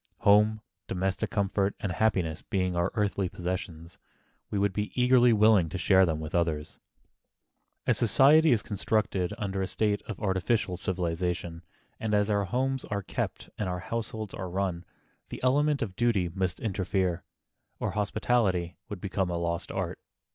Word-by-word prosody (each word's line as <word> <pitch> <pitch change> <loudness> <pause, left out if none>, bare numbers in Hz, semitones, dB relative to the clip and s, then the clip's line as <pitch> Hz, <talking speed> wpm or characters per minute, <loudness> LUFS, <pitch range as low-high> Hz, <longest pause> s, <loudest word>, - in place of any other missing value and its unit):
Home, 105 0 +4 0.3
domestic 95 +1 -1
comfort 100 -2 0
and 100 -4 -2
happiness 90 -5 0
being 95 -2 -1
our 85 +2 +1
best - - -17
earthly 100 -3 0
possessions, 90 -2 -5 0.5
we 105 - -2
would 100 -1 +1
be 105 +2 -2
eagerly 125 -1 +5
willing 105 -6 +5
to 85 - -4
share 95 +1 +4
them 80 -2 -1
with 80 0 -6
others. 80 -3 -1 1.1
As - - +2
society 145 +7 +5
is 115 -4 +2
constructed 100 -3 -1
under 100 -3 -2
a 95 - -1
state 105 0 0
of 110 - -6
artificial 95 0 0
civilization, 90 -1 -2 0.4
and 110 -1 0
as 105 +1 +2
our 100 -1 +1
homes 130 +6 -1
are 100 -1 -3
kept - - -4
and 100 -3 -1
our 90 - -2
households 110 0 -4
are 95 -2 -5
run, 90 -2 -2 0.4
the - - -6
element 145 +2 +2
of 95 -5 -6
duty 105 -6 +1
must 90 0 -2
interfere, 95 -4 -1 0.6
or - - -1
hospitality 105 -4 0
would 100 -4 -6
become 95 -1 -1
a 85 - -1
lost 85 0 -2
art. - - -3
95 Hz, 160 wpm, -28 LUFS, 90-110 Hz, 1.1 s, eagerly